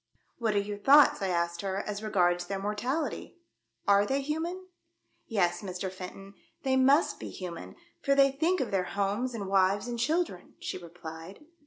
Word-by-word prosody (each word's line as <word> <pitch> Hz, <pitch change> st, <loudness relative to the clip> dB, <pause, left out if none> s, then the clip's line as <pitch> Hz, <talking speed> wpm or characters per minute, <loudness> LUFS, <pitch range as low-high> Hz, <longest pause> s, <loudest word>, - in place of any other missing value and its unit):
*' -, -, -43 dB
What 220 Hz, -3 st, 0 dB
are -, -, +4 dB
your 205 Hz, 0 st, -4 dB
thoughts," 280 Hz, +4 st, +6 dB
I 195 Hz, -, 0 dB
asked 170 Hz, -1 st, -1 dB
her, 195 Hz, -1 st, -2 dB
"as 205 Hz, 0 st, -4 dB
regards 175 Hz, -4 st, +2 dB
their 195 Hz, +1 st, -2 dB
mortality? 225 Hz, -, -3 dB, 0.5 s
Are 200 Hz, 0 st, +6 dB
they 270 Hz, +6 st, 0 dB
human 320 Hz, +5 st, -2 dB, 0.4 s
?' -, -, -44 dB
•'Yes, 175 Hz, -5 st, +2 dB
Mr. 185 Hz, -1 st, -4 dB
Fenton, 190 Hz, +1 st, -9 dB, 0.3 s
they 265 Hz, -1 st, +2 dB
must 270 Hz, +4 st, +4 dB
be -, -, -6 dB
human, 175 Hz, -3 st, -7 dB, 0.3 s
for 275 Hz, -1 st, +2 dB
they 275 Hz, 0 st, +5 dB
think 325 Hz, +7 st, +1 dB
of 255 Hz, -, -2 dB
their 190 Hz, -2 st, +1 dB
homes 210 Hz, +5 st, 0 dB
and 200 Hz, -3 st, -4 dB
wives 195 Hz, +3 st, +2 dB
and 240 Hz, -1 st, -4 dB
children," 310 Hz, -, -1 dB
she -, -, -5 dB
replied. 170 Hz, -, -10 dB
200 Hz, 180 wpm, -29 LUFS, 185-265 Hz, 0.5 s, thoughts